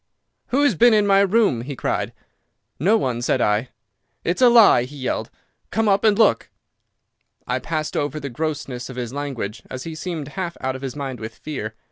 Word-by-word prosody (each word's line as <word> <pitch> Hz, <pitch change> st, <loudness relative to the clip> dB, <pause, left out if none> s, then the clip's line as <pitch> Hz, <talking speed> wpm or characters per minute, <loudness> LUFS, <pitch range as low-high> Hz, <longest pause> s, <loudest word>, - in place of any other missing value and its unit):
"'Who 275 Hz, +3 st, +2 dB
has 270 Hz, -6 st, +4 dB
been 235 Hz, +6 st, +5 dB
in 210 Hz, -1 st, +3 dB
my 195 Hz, -1 st, +5 dB
room?' 200 Hz, -, +3 dB
he 135 Hz, +3 st, -6 dB
cried. -, -, -2 dB, 0.7 s
"'No 200 Hz, -, +4 dB
one,' 125 Hz, -, -1 dB
said 125 Hz, -, +1 dB
I. 105 Hz, +2 st, +1 dB, 0.5 s
"'It's 175 Hz, +8 st, -1 dB
a 250 Hz, -, +8 dB
lie! 225 Hz, -, +6 dB
He 145 Hz, +3 st, -11 dB
yelled. 130 Hz, -2 st, -2 dB, 0.4 s
'Come 220 Hz, +1 st, 0 dB
up 200 Hz, 0 st, +3 dB
and 215 Hz, -2 st, +4 dB
look!' 225 Hz, -, +3 dB, 1.0 s
"I -, -, -1 dB
passed 155 Hz, -2 st, -3 dB
over 145 Hz, +1 st, -1 dB
the 140 Hz, -, -5 dB
grossness 135 Hz, -3 st, -4 dB
of 130 Hz, -, -8 dB
his 125 Hz, -1 st, -5 dB
language, 125 Hz, -7 st, -4 dB
as 130 Hz, -, -6 dB
he 165 Hz, -, -6 dB
seemed 155 Hz, -3 st, -5 dB
half 175 Hz, +1 st, -5 dB
out 130 Hz, 0 st, -2 dB
of 130 Hz, -, -8 dB
his 135 Hz, -1 st, -5 dB
mind 135 Hz, -3 st, -5 dB
with 110 Hz, 0 st, -7 dB
fear. 110 Hz, -8 st, -6 dB
145 Hz, 195 wpm, -22 LUFS, 125-195 Hz, 1.0 s, a